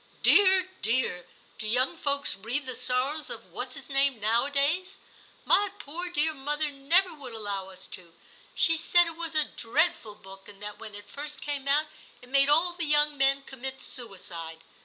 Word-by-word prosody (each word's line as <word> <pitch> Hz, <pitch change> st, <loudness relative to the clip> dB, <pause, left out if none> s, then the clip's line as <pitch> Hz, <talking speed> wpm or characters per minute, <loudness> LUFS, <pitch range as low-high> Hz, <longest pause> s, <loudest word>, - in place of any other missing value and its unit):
* -, -, -31 dB
Dear, 380 Hz, -2 st, +6 dB
dear, 225 Hz, -6 st, 0 dB, 0.3 s
do 215 Hz, -, -1 dB
young 255 Hz, +8 st, +2 dB
folks 285 Hz, -3 st, +1 dB
read 240 Hz, +8 st, -2 dB
the 255 Hz, -, -5 dB
sorrows 255 Hz, +5 st, -1 dB
of -, -, -6 dB
What's -, -, -3 dB
his -, -, -8 dB
name 275 Hz, -3 st, +3 dB
nowadays 280 Hz, -, 0 dB, 0.2 s
} -, -, -28 dB
My 410 Hz, 0 st, +4 dB
poor 350 Hz, +1 st, -6 dB
dear 315 Hz, -1 st, +3 dB
mother 295 Hz, +2 st, -1 dB
never 330 Hz, +7 st, +1 dB
would 270 Hz, -6 st, -10 dB
allow 200 Hz, -3 st, -4 dB
us 185 Hz, 0 st, -11 dB
to. 170 Hz, -2 st, -8 dB, 0.4 s
She 325 Hz, 0 st, +3 dB
said 345 Hz, +2 st, +4 dB
it 330 Hz, -1 st, -7 dB
was 330 Hz, -1 st, -4 dB
a 310 Hz, -, +5 dB
dreadful 230 Hz, -4 st, -1 dB
book, 195 Hz, 0 st, -12 dB
and 200 Hz, -1 st, -13 dB
that 210 Hz, 0 st, -7 dB
when 210 Hz, -, -9 dB
it 205 Hz, 0 st, -11 dB
first 295 Hz, +1 st, -6 dB
came 285 Hz, -2 st, -3 dB
out 295 Hz, +2 st, +3 dB, 0.3 s
it 245 Hz, -, -16 dB
made 275 Hz, +1 st, +4 dB
all 335 Hz, +4 st, +3 dB
the 345 Hz, -1 st, -3 dB
young 295 Hz, 0 st, +4 dB
men 275 Hz, 0 st, +2 dB
commit 265 Hz, 0 st, -7 dB
suicide. 170 Hz, -9 st, -8 dB
275 Hz, 185 wpm, -27 LUFS, 225-310 Hz, 0.4 s, Dear